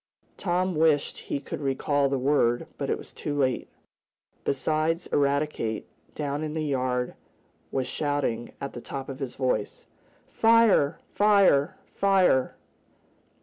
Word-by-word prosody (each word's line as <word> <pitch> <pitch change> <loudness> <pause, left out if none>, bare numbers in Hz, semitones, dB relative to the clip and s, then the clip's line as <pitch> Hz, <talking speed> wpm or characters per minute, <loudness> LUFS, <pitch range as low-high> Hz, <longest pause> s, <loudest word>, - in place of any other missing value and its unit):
Tom 185 0 0
wished 155 -2 +2
he - - -3
could 140 - -7
recall 140 +1 +1
the 135 - 0
word, 125 -3 +2
but - - -2
it - - +1
was - - -12
too 145 - -4
late. 130 -3 0 0.7
Besides 155 +5 0
Eradicate, 140 -6 0 0.3
down 145 0 -2
in 155 0 -4
the 155 -1 -1
yard 125 -3 -1 0.6
was 130 -1 -1
shouting 145 -6 -2
at 140 - -5
the 120 - -7
top 135 +2 -6
of 135 - -6
his 135 -3 -5
voice: 125 -6 -2 0.4
"Fire! 225 -10 +4 0.2
Fire! 200 -9 +4 0.2
Fire!" 190 -9 +3
145 Hz, 130 wpm, -26 LUFS, 130-155 Hz, 0.7 s, Fire